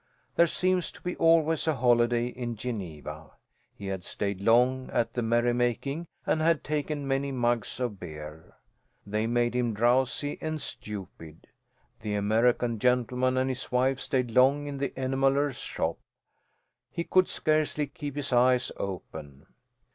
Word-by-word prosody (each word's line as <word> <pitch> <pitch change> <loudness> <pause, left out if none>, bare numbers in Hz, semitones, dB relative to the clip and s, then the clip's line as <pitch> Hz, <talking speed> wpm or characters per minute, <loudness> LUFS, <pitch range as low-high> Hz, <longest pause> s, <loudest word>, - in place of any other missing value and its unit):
There 170 - +5
seems 185 +1 +1
to - - -15
be 180 - -3
always 165 -1 +3
a 160 - +2
holiday 120 -1 +3
in 120 -1 -4
Geneva. 80 - -6 0.4
He 100 - -9
had 95 -2 -4
stayed 100 0 -3
long 125 +4 +3
at 115 - 0
the 120 - -1
merrymaking 120 +6 0 0.2
and 155 - +1
had 165 -1 +2
taken 150 -1 -2
many 135 +1 0
mugs 120 -3 0
of 120 -6 -3
beer. 75 -2 -9 0.5
They 105 +2 -1
made 120 0 +1
him 120 -3 0
drowsy 125 +5 +1
and 155 0 -3
stupid. 95 - -7 0.5
The 105 -1 -3
American 115 +3 +2
gentleman 125 +2 +1
and 130 0 +2
his 130 -1 -3
wife 130 +1 +2
stayed 125 -3 -1
long 135 +4 +4
in 140 -1 -5
the 140 - 0
enameller's 135 +1 +1
shop. - - -2 0.9
He 170 - -3
could 185 +1 +3
scarcely 155 -1 +1
keep 145 0 -7
his 140 -2 -3
eyes 125 0 +4
open. 75 -6 -7
125 Hz, 145 wpm, -28 LUFS, 115-140 Hz, 0.9 s, There